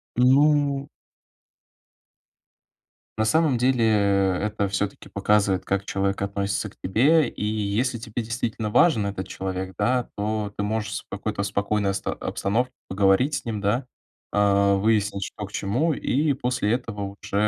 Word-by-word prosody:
Ну 140 +2 +3 2.3
На 110 - +2
самом 155 +1 +3
деле, 125 -1 +3 0.6
это 105 -1 -1
всё-таки 100 +1 -3
показывает, 100 -2 +1
как 100 0 -1
человек 100 0 -1
относится 100 +1 -2
к - - -22
тебе, 140 - +3
и - - -5
если 110 +4 -1
тебе 115 +1 -4
действительно 115 -1 -3
важен 130 -6 +4
этот 95 -2 -4
человек, 95 0 -5
да, 125 -1 +1
то 105 0 -2
ты 105 - -1
можешь 105 -1 -2
с - - -4
какой-то 100 - -3
спокойной 100 0 0
оста 95 - -3
обстановке 115 +6 -1 0.2
поговорить 100 +9 +2
с - - -4
ним, 110 -3 -3
да, 110 +6 0 0.5
а, 100 -1 +3
выяснить, 100 -1 +1
что 105 - -7
к 100 - -13
чему, 125 +13 0
и 145 +2 +1
после 125 -5 -1
этого 100 -5 -4
уже, - - -11
105 Hz, 140 wpm, -24 LUFS, 100-125 Hz, 2.3 s, важен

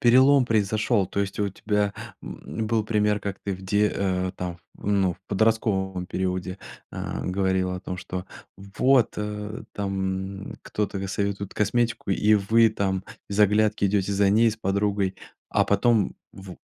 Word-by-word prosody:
перелом 130 +3 +6
произошёл? 110 -1 +1
То 100 - -2
есть, 100 -1 -3
а - - +3
у 100 - 0
тебя, 105 +1 -1 0.3
м - - -7
м, 110 - 0
был 110 -1 +1
пример, 105 -1 +1
как 100 -1 -4
ты 100 - -2
где, 105 +3 +1
э, 95 -1 -1
там, 90 -1 -4 0.2
ну, 95 -3 +1
в - - -26
подростковом 95 -3 +1
периоде, 90 0 -2 0.3
а, - - -4
говорила 95 0 0
о - - -7
том, 90 -1 -5
что, 90 0 -5 0.3
вот, 115 +6 +2
э, 105 +1 -4
там 95 0 -3
кто-то 105 -2 -3
достаёт 100 +1 -2
вот 100 - -6
косметику, 115 0 0
и 105 +2 +4
вы 110 +3 +4
там 95 -3 -1 0.2
без 100 - -4
оглядки 105 0 +3
идёте 100 0 +1
за 100 0 +3
ней 115 +3 +5
с 110 - -6
подругой. 100 -1 0 0.3
А - - +3
потом 105 0 +2 0.2
в 95 -2 -10
100 Hz, 160 wpm, -25 LUFS, 95-105 Hz, 0.3 s, перелом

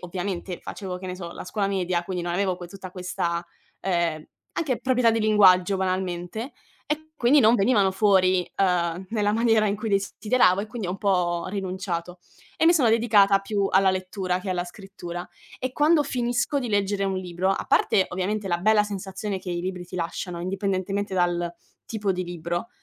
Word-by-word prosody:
ovviamente 180 0 -4
facevo, 185 -3 -6
che 185 - -8
ne 180 0 -5
so, 170 -2 -7
la - - -8
scuola 200 +1 -1
media, 185 -3 0
quindi 180 -2 -3
non 175 0 -2
avevo 185 -1 0
que 175 - -8
tutta 190 -1 -9
questa, 175 -2 -3 0.4
ehm, 170 -4 0 0.3
anche 280 -7 -1
proprietà 250 -3 +3
di 225 0 0
linguaggio 195 -3 +5
banalmente, 185 - -3 0.3
e 315 +1 -4
quindi 275 +3 +5
non 225 +1 +6
venivano 200 -3 +3
fuori, 185 -2 +3
ehm, 180 -1 0
nella 210 -2 +1
maniera 225 -1 +3
in 205 0 0
cui 220 +1 -4
desideravo 200 0 +2
e 210 - -4
quindi 220 -3 -5
ho - - -1
un 190 - -4
po' 180 -4 +1
rinunciato 185 -2 -4 0.4
e 320 - +3
mi 340 - +6
sono 270 -8 +4
dedicata 210 -4 +5
più 200 0 -1
alla 190 0 +4
lettura 185 -1 -2
che 190 - -4
alla 175 -1 -1
scrittura. 175 -2 -8 0.3
E 255 0 -3
quando 300 +2 +4
finisco 245 +1 0
di 250 -4 -3
leggere 200 -1 0
un 195 -1 -1
libro, 180 0 -2
a 195 - -1
parte, 190 - +3
ovviamente, 195 +3 -2
la 175 -1 +1
bella 210 +3 +4
sensazione 200 0 -4
che 185 - -10
i 175 0 -2
libri 180 -1 -4
ti 185 - -8
lasciano 170 +1 -4
indipendentemente 195 +1 -2
dal 175 -1 0 0.3
tipo 210 -3 -1
di 185 0 -3
libro, 175 +4 -4
190 Hz, 185 wpm, -25 LUFS, 180-210 Hz, 0.4 s, non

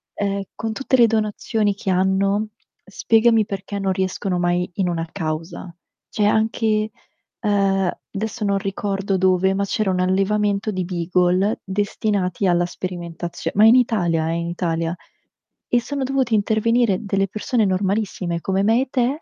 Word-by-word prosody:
ehm, 200 -1 -1
con 225 0 -4
tutte 265 +2 0
le 235 -2 +6
donazioni 215 -1 0
che 195 - -5
hanno, 195 +3 +1 0.3
spiegami 225 +2 +3
perché 200 0 -5
non 190 -1 0
riescono 185 0 -2
mai 175 0 0
in 185 -3 0
una 165 -1 -2
causa. 165 +2 -5 0.4
Cioè 210 - 0
anche, 220 0 +1 0.5
ehm, 195 -3 +2 0.2
adesso 220 +2 -4
non 200 0 +1
ricordo 195 0 -2
dove, 185 +1 +3
ma 200 - 0
c'era 215 -2 0
un 180 - -1
allevamento 200 +2 +1
di 185 -1 -2
Beagle 180 +3 +1
destinati 200 -1 -1
alla 175 -1 +3
sperimentazio 175 -1 -5
ma 210 +2 +6
in 225 - +8
Italia 175 -10 +2
eh, - - 0
in 170 0 -2
Italia. 170 -1 -2 0.7
E 240 -1 +3
sono 280 +2 -3
dovuti 260 -3 0
intervenire 220 0 +2
delle 195 0 0
persone 215 +3 0
normalissime 190 -2 -1
come 195 +2 0
me 225 +4 +3
e - - -9
te 260 +5 0
195 Hz, 150 wpm, -21 LUFS, 185-215 Hz, 0.7 s, in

